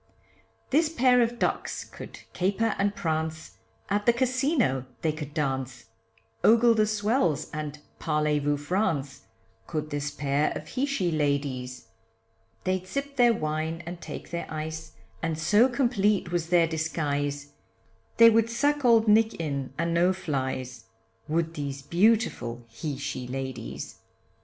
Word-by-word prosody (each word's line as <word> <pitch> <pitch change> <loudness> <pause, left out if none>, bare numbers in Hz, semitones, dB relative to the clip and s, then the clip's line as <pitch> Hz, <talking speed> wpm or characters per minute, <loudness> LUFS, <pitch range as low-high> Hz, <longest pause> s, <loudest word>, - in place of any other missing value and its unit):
This 305 +3 +3
pair 255 -5 +4
of 235 0 0
ducks - - -1
could - - -11
caper 205 +4 +1
and 200 +1 +1
prance, 160 -3 -3 0.3
At 205 +2 -1
the 235 - +7
Casino 255 - +1 0.2
they 160 - +2
could 150 -1 -7
dance, 130 -5 -3 0.5
Ogle 235 +1 +6
the 215 -1 +2
swells, 210 - 0
and 150 -1 -4 0.2
parle 150 -1 +1
vou 145 0 0
France, 145 -4 -1 0.4
Could 155 -2 -3
this 145 0 -2
pair 145 0 0
of 155 - -7
he 270 +3 -1
she 195 -11 0
ladies 140 -5 -2 0.7
They'd 185 0 -1
sip 280 +5 -4
their 240 -3 +5
wine 155 0 -2
and 175 0 -7
take - - -8
their 170 -1 -4
ice, 160 +1 -5 0.3
And 165 -1 -1
so 210 +10 +4
complete 215 -7 +1
was 175 -2 -1
their 175 -1 +5
disguise, 145 -3 -2 0.6
They 230 0 +9
would 225 0 +3
suck 285 +5 +1
old 230 -2 +5
nick 220 +1 +4
in 140 -5 -3
and 170 0 0
no 175 +2 +3
flys, 130 -8 -3 0.4
Would 165 +1 0
these 140 -3 -5
beautiful 170 - +1
he 135 +5 -5
she 130 -3 -4
ladies. 130 -2 -6
160 Hz, 140 wpm, -27 LUFS, 145-220 Hz, 0.7 s, They